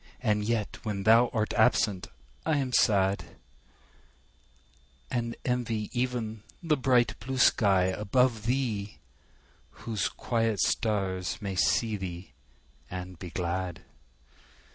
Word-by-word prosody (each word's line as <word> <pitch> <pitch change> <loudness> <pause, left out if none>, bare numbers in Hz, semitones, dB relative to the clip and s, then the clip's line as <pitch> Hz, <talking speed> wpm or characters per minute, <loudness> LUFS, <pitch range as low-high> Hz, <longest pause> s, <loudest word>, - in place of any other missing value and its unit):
And 105 -4 +1
yet 110 -1 -2
when 105 -3 -3
thou 115 +4 +6
art 110 -2 -1
absent 105 -4 +2 0.4
I 155 - +1
am 130 -3 -2
sad; 100 -4 +3 1.9
And 120 -2 -2
envy 115 -4 -1
even 120 -3 -2 0.2
the 160 -2 +2
bright 125 -3 +2
blue 130 +4 -4
sky 100 -6 +4
above 110 +4 +1
thee, 115 -6 -1 0.9
Whose 110 -3 -1
quiet 115 -4 -1
stars 95 -4 0
may 100 -2 -4
see 110 +3 +2
thee 90 -1 -7 0.6
and 90 -1 -7
be 90 - -7
glad. 90 +1 -3
110 Hz, 110 wpm, -28 LUFS, 95-120 Hz, 1.9 s, thou